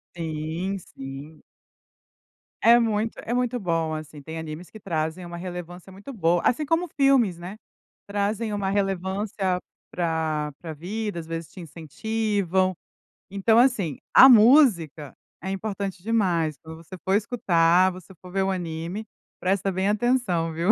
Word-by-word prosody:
Sim, 165 Hz, +4 st, -3 dB
sim. 140 Hz, -1 st, -10 dB, 1.2 s
É 235 Hz, +1 st, +7 dB
muito 225 Hz, -1 st, 0 dB
é 235 Hz, -, -3 dB
muito 245 Hz, 0 st, 0 dB
bom 165 Hz, -4 st, -1 dB
assim, 155 Hz, -1 st, -7 dB
tem 160 Hz, +3 st, -7 dB
animes 160 Hz, +2 st, -7 dB
que 220 Hz, -, -12 dB
trazem 160 Hz, -1 st, -3 dB
uma 170 Hz, 0 st, -7 dB
relevância 175 Hz, +1 st, -8 dB
muito 205 Hz, +8 st, -10 dB
boa, 175 Hz, -7 st, +1 dB
assim 300 Hz, +5 st, +2 dB
como 330 Hz, +3 st, 0 dB
filmes, 270 Hz, -, +3 dB
né, 180 Hz, +5 st, -8 dB, 0.5 s
trazem 205 Hz, +2 st, -1 dB
uma 200 Hz, -2 st, -1 dB
relevância 195 Hz, -1 st, -1 dB, 0.3 s
para 160 Hz, -3 st, -1 dB
para 160 Hz, -2 st, -6 dB
vida, 200 Hz, +4 st, -4 dB
às 165 Hz, -, -7 dB
vezes 165 Hz, -1 st, -5 dB
te 185 Hz, -, -10 dB
incentivam. 185 Hz, +3 st, -1 dB, 0.6 s
Então 210 Hz, +4 st, +3 dB
assim, 210 Hz, -, +2 dB, 0.2 s
a 265 Hz, -, +10 dB
música 215 Hz, -, +5 dB, 0.3 s
é 190 Hz, +2 st, -4 dB
importante 195 Hz, -2 st, -4 dB
demais, 180 Hz, -8 st, +1 dB
quando 160 Hz, 0 st, -9 dB
você 170 Hz, +3 st, -11 dB
for 190 Hz, -, +1 dB
escutar, 185 Hz, -5 st, +3 dB
você 185 Hz, +1 st, -12 dB
for 180 Hz, -1 st, -12 dB
ver 195 Hz, 0 st, 0 dB
o 195 Hz, -, 0 dB
anime, 175 Hz, +3 st, -4 dB, 0.3 s
presta 195 Hz, +1 st, 0 dB
bem 190 Hz, +2 st, -1 dB
atenção 210 Hz, -7 st, +1 dB
viu. 170 Hz, +6 st, +2 dB
185 Hz, 145 wpm, -25 LUFS, 165-210 Hz, 1.2 s, a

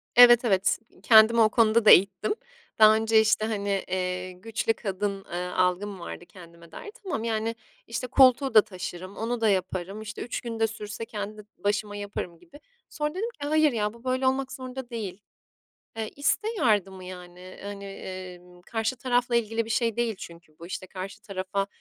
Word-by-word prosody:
Evet, 240 Hz, 0 st, +8 dB
evet. 190 Hz, -4 st, +2 dB, 0.2 s
Kendimi 225 Hz, +1 st, +7 dB
o 215 Hz, -, +6 dB
konuda 225 Hz, 0 st, +3 dB
da -, -, +9 dB
eğittim 195 Hz, -, +4 dB, 0.4 s
daha 215 Hz, 0 st, +8 dB
önce. 220 Hz, 0 st, +3 dB
İşte, 220 Hz, 0 st, +2 dB
hani, 200 Hz, -3 st, -1 dB
iii, 180 Hz, 0 st, -3 dB
güçlü 225 Hz, +1 st, -1 dB
kadın, 195 Hz, -2 st, -3 dB
ııı, 180 Hz, +1 st, -5 dB
algım 185 Hz, +2 st, 0 dB
vardı 175 Hz, 0 st, -8 dB
kendime 170 Hz, -2 st, -15 dB
dair. 415 Hz, -, -9 dB
Tamam, 350 Hz, -, -3 dB
yani, 225 Hz, 0 st, -1 dB, 0.3 s
işte, 235 Hz, +2 st, -4 dB
koltuğu 260 Hz, +1 st, +5 dB
da 215 Hz, -, +9 dB
taşırım, 185 Hz, -1 st, -8 dB
onu 230 Hz, +1 st, -2 dB
da 220 Hz, -, +4 dB
yaparım, 190 Hz, +1 st, -2 dB
işte, 215 Hz, 0 st, -7 dB
3 240 Hz, -, -4 dB
gün 230 Hz, -2 st, -5 dB
de 225 Hz, -, +3 dB
sürse 215 Hz, 0 st, -7 dB
kendi 210 Hz, 0 st, -6 dB
başıma 205 Hz, 0 st, -1 dB
yaparım 200 Hz, -4 st, -6 dB
gibi. 295 Hz, -4 st, -16 dB, 0.3 s
Sonra 300 Hz, 0 st, -2 dB
dedim 435 Hz, +5 st, -2 dB
ki, 290 Hz, -, -2 dB
"Hayır 310 Hz, 0 st, +4 dB
ya, 210 Hz, -3 st, -1 dB
bu 235 Hz, 0 st, -17 dB
böyle 260 Hz, 0 st, 0 dB
olmak 265 Hz, 0 st, 0 dB
zorunda 260 Hz, -1 st, -7 dB
değil." 210 Hz, -5 st, -6 dB, 0.8 s
Iıı, 220 Hz, -1 st, -2 dB
işte, 315 Hz, +9 st, +1 dB
yardımı, 195 Hz, -, +1 dB
yani, 180 Hz, 0 st, -11 dB
hani, 200 Hz, 0 st, -7 dB, 0.6 s
ımm, 180 Hz, 0 st, -18 dB
karşı 225 Hz, +5 st, -2 dB
tarafla 245 Hz, -1 st, +1 dB
ilgili 225 Hz, 0 st, 0 dB
bir 225 Hz, -, -10 dB
şey 230 Hz, -1 st, +1 dB
değil 235 Hz, -2 st, 0 dB
çünkü 170 Hz, -3 st, -12 dB
bu. 170 Hz, -, -10 dB
İşte, 185 Hz, +1 st, -6 dB
karşı 190 Hz, +1 st, -8 dB
tarafa, 195 Hz, 0 st, -3 dB
215 Hz, 175 wpm, -26 LUFS, 185-235 Hz, 0.8 s, da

